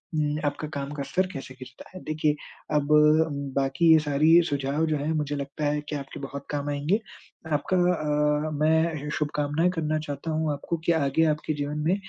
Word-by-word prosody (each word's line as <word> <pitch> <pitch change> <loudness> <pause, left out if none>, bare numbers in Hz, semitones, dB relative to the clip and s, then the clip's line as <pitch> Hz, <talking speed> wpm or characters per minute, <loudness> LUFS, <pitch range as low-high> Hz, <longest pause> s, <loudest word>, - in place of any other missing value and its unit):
उम, 150 -1 0
आपका 145 +1 -2
काम 140 0 -4
का 145 -1 -4
स्तर 180 +7 0
कैसे 135 -1 -7
गिरता 130 0 -12
है। 185 - -8
देखिए, 155 -1 0 0.4
अब 145 -1 +1 0.7
बाकी 140 +5 +3
ये 160 - +6
सारी 155 +3 +4
सुझाव 140 +2 0
जो 155 - 0
हैं, 145 +2 -2
मुझे 150 -2 -1
लगता 140 +2 -4
है 150 0 0
कि 150 - -2
आपके 140 -1 -8
बहुत 140 0 -6
काम 145 0 -2
आएँगे। 145 +8 0 0.6
आपका 185 +6 -1 0.2
अ, 150 -1 0
मैं 160 +1 +4
ऐसे 150 -1 -5
शुभकामनाएँ 150 +3 0
करना 155 -1 0
चाहता 150 +1 -5
हूँ 155 0 0
आपको 145 +4 -3
कि - - +4
आगे 140 +3 +2
आपके 155 +1 -4
जीवन 145 +1 -3
में 185 - +3
150 Hz, 190 wpm, -26 LUFS, 145-155 Hz, 0.7 s, ये